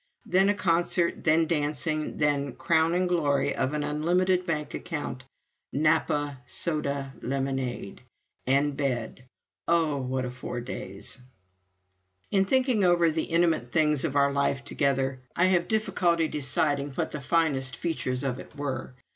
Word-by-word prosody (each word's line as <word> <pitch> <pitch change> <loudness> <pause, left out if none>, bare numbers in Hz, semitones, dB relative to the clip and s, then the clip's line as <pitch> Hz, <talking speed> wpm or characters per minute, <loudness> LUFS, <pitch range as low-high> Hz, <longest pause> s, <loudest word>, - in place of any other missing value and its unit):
Then 190 +2 +3
a 205 - +2
concert, 170 -1 +1
then 165 +1 +4
dancing, 155 -1 -1
then 140 -3 +1
crowning 165 +2 +2
glory 145 -6 +1
of 130 +3 -1
an 150 - -1
unlimited 180 +5 +1
bank 150 -3 -2
account 145 -6 -5 0.5
Napa 145 -2 +1
soda 140 -3 -1
lemonade 135 -5 -3 0.5
and 140 +2 +2
bed. 130 -2 -3 0.4
Oh, 165 -4 +2
what 130 -1 -2
a 125 - -4
four 125 -1 -5
days! 100 -3 -7 1.1
In 195 -1 +3
thinking 255 -1 +2
over 175 -2 +4
the 160 0 -1
intimate 165 -8 +1
things 150 -2 +3
of 150 -4 -2
our 140 0 +4
life 140 -1 0
together, 135 -2 0 0.2
I 180 - +4
have 175 -1 +2
difficulty 180 -6 +1
in - - -4
deciding 145 0 0
what - - -2
the 150 - -5
finest 140 -4 +1
features 130 -6 -2
of 130 -3 -2
it - - -12
were. 140 -2 -4
150 Hz, 140 wpm, -27 LUFS, 135-170 Hz, 1.1 s, then